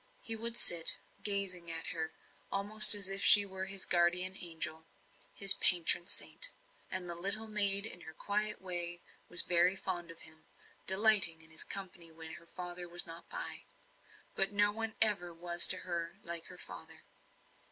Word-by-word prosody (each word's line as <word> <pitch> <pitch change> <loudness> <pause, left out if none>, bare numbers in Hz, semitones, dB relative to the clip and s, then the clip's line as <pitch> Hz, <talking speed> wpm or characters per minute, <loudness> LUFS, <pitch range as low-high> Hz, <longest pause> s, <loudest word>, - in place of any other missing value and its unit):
He 225 - 0
would 230 +1 -6
sit, 170 -2 +2 0.3
gazing 190 -4 -2
on 165 0 -6
her 160 -1 -7 0.4
almost 210 +2 +6
as 200 -2 -2
if 195 +1 -2
she 205 -1 +7
were 190 -1 -7
his 195 -1 -5
guardian 180 +2 0
angel 160 -2 -7 0.4
his 195 -1 +2
patron 175 0 0
saint. - - -2 0.4
And 185 -1 -7
the 175 - -1
little 200 +6 -1
maid 200 -2 +4
in 175 -5 -8
her 160 - -14
quiet 210 +3 -5
way 175 -1 -3 0.3
was 175 - +6
very 175 +2 0
fond 175 -3 -7
of 165 - -12
him; 155 0 -13 0.4
delighting 190 -4 +6
in 160 - -13
his 160 - -5
company 185 -3 -8
when 160 0 -12
her 170 - -25
father 175 0 -11
was 175 0 0
not 165 0 -15
by. - - -9 0.7
But 195 +1 0
no 205 0 -1
one 225 +1 -8
ever 195 -5 +1
was 175 +1 +2
to - - -1
her 170 0 -8
like 170 -1 -5
her - - -10
father. - - -12
180 Hz, 170 wpm, -29 LUFS, 170-200 Hz, 0.7 s, she